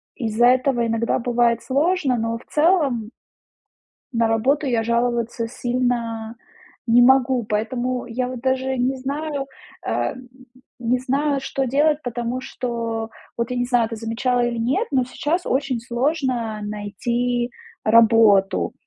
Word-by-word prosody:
из-за 235 -1 +2
этого 250 -1 +3
иногда 230 0 0
бывает 235 -1 +1
сложно, 290 -1 +1
но 230 0 -1
в 230 - -16
целом 295 - +2 1.0
На 230 -1 +2
работу 265 +7 +1
я 235 -3 +1
жаловаться 235 0 0
сильно 240 -2 -2 0.5
не 240 +1 +5
могу, 255 -1 +4
поэтому 240 +4 -2
я, 250 +2 -2
вот, 255 -1 -6
даже 260 +1 0
не 255 +2 +1
знаю 280 +1 -3 0.4
а, - - -1
м, 255 -1 -12 0.5
не 245 +1 +1
знаю, 275 +2 0
что 270 0 -2
делать, 295 +4 +2
потому 240 +1 -3
что 230 -3 -4 0.3
вот, 235 0 -2
я 250 - -2
не 245 - +1
знаю, 245 -2 +2
ты 225 - -4
замечала 230 +3 -1
или 240 0 -2
нет, 265 - 0
но 265 -3 +2
сейчас 305 +7 -2
очень 265 -2 0
сложно 240 -3 -1
найти 235 +4 -2 0.3
работу. 220 -3 +4
245 Hz, 135 wpm, -22 LUFS, 230-265 Hz, 1.0 s, не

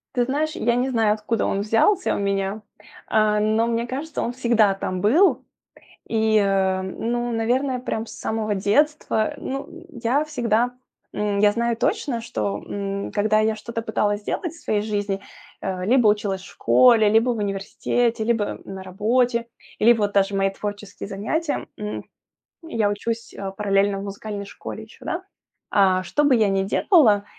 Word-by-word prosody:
Ты 245 - +3
знаешь, 295 +5 -1
я 235 -7 +1
не 255 +2 0
знаю, 220 -4 +2
откуда 220 +2 -1
он 195 - 0
взялся 225 - +2
у - - -2
меня, 200 +1 -1 0.5
э, 215 -1 +3
но 220 +2 +2
мне 235 0 0
кажется, 285 +6 -4
он 240 - -1
всегда 235 -5 +3
там 185 -1 -4
был. 265 - +4 0.6
И, 220 -1 +2
э, 190 -2 +2
ну, 240 +5 -2
наверное, 250 +3 0
прям 225 -2 -3
с 220 - -11
самого 220 -1 -2
детства, 220 +3 +1
ну, 270 +1 -4
м, 345 +1 -12 0.2
я 270 +6 +2
всегда 245 -4 0 0.4
М, 205 -1 -1
я 205 0 +5
знаю 235 -1 0
точно, 245 0 0
что, 105 - -3
м, 200 0 -4
когда 215 +1 +2
я 215 0 +2
что-то 230 +1 -5
пыталась 210 -2 0
сделать 330 - -3
в 335 - -15
своей 210 -1 0
жизни, 205 -2 -2 0.4
э, 185 -1 -3
либо 240 0 +4
училась 200 -3 0
в - - -13
школе, 235 -4 +5
либо 225 +3 +3
в 230 - -2
университете, 210 +3 -1
либо 225 -3 0
на 190 -1 -7
работе, 235 +5 +1 0.3
либо 230 +1 +5
вот 205 -1 +1
даже 195 0 +2
мои 195 0 +2
творческие 205 0 -6
занятия, 285 +11 -2
м, 210 0 -5 0.6
я 230 -10 0
учусь 230 +3 -4 0.2
параллельно 200 -1 +2
в 200 - -5
музыкальной 200 0 -6
школе 220 +2 -8
ещё, 220 - -17
да. 360 +2 -3 0.5
Э, 190 -2 +4
что 295 +11 0
бы 265 -4 +5
я 215 -3 +3
не 195 0 +1
делала, 215 - +4
220 Hz, 165 wpm, -23 LUFS, 200-240 Hz, 0.6 s, я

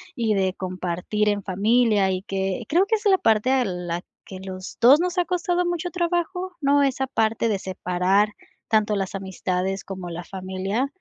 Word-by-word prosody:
y 225 -4 +1
de 190 -1 +1
compartir 185 +3 -2
en 205 -1 +1
familia, 205 0 +2
y 185 0 -2
que 195 +1 -2
creo 355 +5 +4
que 445 +2 +2
esa 420 -1 +1
es - - +5
la 380 - +5
parte 225 +1 +2
a 260 -2 +3
la 175 -2 -3 0.2
que 190 -1 -9
los 185 0 -8
dos 270 +7 +7
nos 360 0 -2
ha 355 - +3
costado 360 0 0
mucho 350 0 -2
trabajo, 355 +1 -2
¿no?, 285 +1 +4
esa 265 -1 +1
parte 225 -1 +1
de 200 -2 0
separar 185 +2 +1 0.4
tanto 215 -1 +2
las 195 0 -3
amistades 190 0 -2
como 185 -2 -7
la 170 +1 -6
familia, 190 +7 -3
210 Hz, 185 wpm, -24 LUFS, 190-280 Hz, 0.4 s, dos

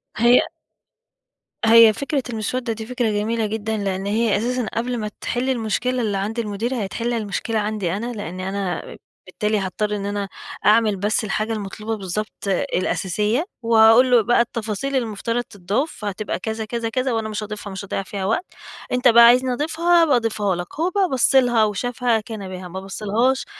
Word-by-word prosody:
هي 240 +3 +5 1.3
هي 225 0 +8
فكرة 280 +2 -2
المسودة 235 +2 -2
دي 220 0 -7
فكرة 245 -1 -1
جميلة 220 +2 0
جدًا، 220 +1 -2
لأن 195 -2 -2
هي 215 +1 +1
أساسًا 245 +3 -1
قبل 245 +2 -2
ما 210 -2 -4
تحل 245 +2 -1
المشكلة 250 +1 -1
اللي 210 -3 -1
عند 210 +4 -3
المدير، 225 +2 -2
هتحل 235 +5 -3
المشكلة 220 0 -2
عندي 210 -4 -2
أنا، 230 +5 -3
لأنِ 185 -4 -6
أنا 190 -2 -4 0.3
بالتالي 210 +3 -1
هاضطر 210 +2 -2
إن 200 -1 -4
أنا 200 -1 -3 0.4
أعمل 215 -1 +4
بس 210 +4 0
الحاجة 215 +2 -1
المطلوبة 215 +1 -4
بالضبط 200 +2 -5
الأساسية، 200 - 0 0.2
وأقول 230 +2 +6
له 240 -2 +6
بقى 240 +2 +3
التفاصيل 230 +3 -3
المفترض 230 0 -1
تضاف 205 - -2
فهتبقى 205 -1 -4
كذا 220 +2 -4
كذا 230 +1 -3
كذا، 255 +2 -1
وأنا 220 -1 -2
مش 215 0 -4
هاضيفها، 210 -1 -7
مش 195 +1 -6
هاضيع 195 - -3
فيها 195 0 -5
وقت. 225 - 0 0.5
أنت 250 +1 +2
بقى 235 0 +8
عايزني 250 +2 +5
أضيفها 335 +5 +2
أبقى 295 -5 +3
اضيفها 215 -5 0
لك، 175 0 -7
هو 340 +3 +2
بقى 380 -1 +1
بص 265 +1 +2
لها 245 -4 +5
و 210 - -2
شافها 245 +1 0
كان 215 -2 -7
بها، 185 -1 -7
ما 185 +2 -6
بص 195 +2 -8
لهاش 240 +6 +1
220 Hz, 175 wpm, -21 LUFS, 205-240 Hz, 1.3 s, هي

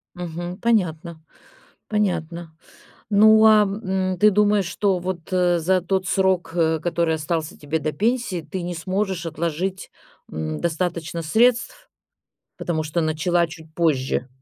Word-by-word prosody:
Мгм, 175 +1 -6
понятно 170 -8 0 0.7
понятно. 170 -5 -2 0.5
Ну, 220 +2 +6
а, 215 -1 +7
м, 190 -2 -2
ты 210 +1 +5
думаешь, 205 -1 +3
что 190 0 0
вот, 180 0 -6
э, 175 -2 +2
за 185 +3 +2
тот 185 +1 -1
срок, 190 -3 +1
э, 160 -2 +2
который 170 -1 0
остался 160 0 -3
тебе 150 +2 -3
до 155 0 -3
пенсии, 220 -5 -1
ты 185 +2 -6
не 175 0 -4
сможешь 185 0 -2
отложить, 170 +3 -3 0.4
м, 80 0 -4
достаточно 170 -1 -2
средств, 240 - +1 0.7
потому 160 -2 -2
что 155 +2 -2
начала 165 +2 +1
чуть 160 -1 -12
позже? 135 -6 0
175 Hz, 135 wpm, -22 LUFS, 160-190 Hz, 0.7 s, а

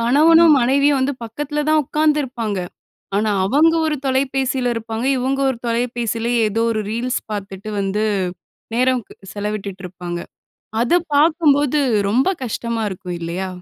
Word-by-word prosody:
கணவனும், 315 +7 +6
மனைவியும் 280 +3 +3
வந்து 270 +2 +1
பக்கத்துல 295 +6 -3
தான் 310 0 +4
ஒக்காந்துருப்பாங்க. 265 -9 0 0.6
ஆனா 210 +1 +1
அவங்க 310 +9 +4
ஒரு 310 -1 0
தொலைபேசில 265 -1 0
இருப்பாங்க, 225 +1 -4
இவுங்க 265 +2 -1
ஒரு 250 - -2
தொலைபேசில 235 -1 -1 0.2
ஏதோ 225 +2 -1
ஒரு 215 - -1
ரீல்ஸ் 245 +3 -1
பாத்துட்டு 200 0 -6
வந்து 200 +2 -1 0.7
நேரம் 255 0 +2
க் - - -14 0.2
செலவிட்டுட்டுருப்பாங்க. 190 -4 -5 0.6
அத 240 +5 +1 0.2
பாக்கும்போது, 295 -2 +3 0.3
ரொம்ப 255 - +2 0.2
கஷ்டமா 235 -1 -3
இருக்கும் 180 -2 -6
இல்லையா? 175 +3 -3
245 Hz, 125 wpm, -20 LUFS, 210-280 Hz, 0.7 s, கணவனும்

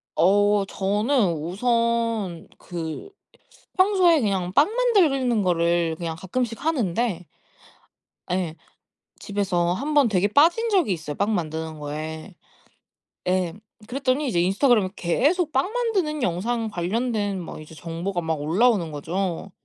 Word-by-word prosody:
어 205 +4 +4
저는 205 +3 +1
우선 225 +2 -1
그 165 - -6 0.7
평소에 370 -4 +4
그냥 190 -5 -1
빵 285 - +4
만드는 330 - +2
거를 170 -1 +1
그냥 165 -2 -4
가끔씩 230 - -3
하는데 230 - 0 1.1
예. 180 -3 -1 0.6
집에서 180 -4 0
한번 290 +2 +2
되게 200 -1 +2
빠진 340 - +3
적이 365 - +2
있어요 155 -3 -6
빵 205 +2 0
만드는 160 -2 -3
거에. 155 +5 -6 1.0
예. 180 -2 0 0.3
그랬더니 265 +3 0
이제 175 -8 +1
인스타그램에 200 +2 +3
계속 300 - +1
빵 270 +10 +1
만드는 400 - -1
영상 225 +6 -1
관련된 205 +1 -1
막 165 - -8
이제 155 +1 -13
정보가 170 +4 -4
막 160 -2 -2
올라오는거죠. 175 -1 0
200 Hz, 255 characters per minute, -24 LUFS, 170-255 Hz, 1.1 s, 어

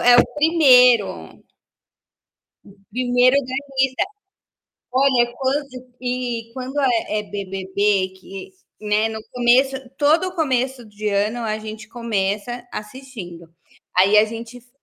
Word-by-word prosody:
é 245 0 +6
o - - +7
1º. 250 - +4 1.5
1º 250 +2 +3
da 260 -2 -1 0.2
lista. 265 +3 +2 0.9
Olha, 255 -2 +3
quando 275 +2 -1 0.3
e 245 -2 -3
quando 265 +2 -4
é 235 -5 +1
é - - -7
BBB, 195 0 -1
que, 190 0 -10 0.3
né, 210 +1 +1
no 220 0 -6
começo 250 +2 +3 0.2
todo 325 +5 +2
começo 265 -5 -1
de 210 0 -5
ano 210 +4 0
a 215 -2 -2
gente 215 0 -9
começa 230 +1 -3
assistindo. 210 -8 -9 0.5
Aí 195 +3 +5
a 210 - +6
gente 230 +2 -8
f 245 0 -23
240 Hz, 115 wpm, -21 LUFS, 210-260 Hz, 1.5 s, o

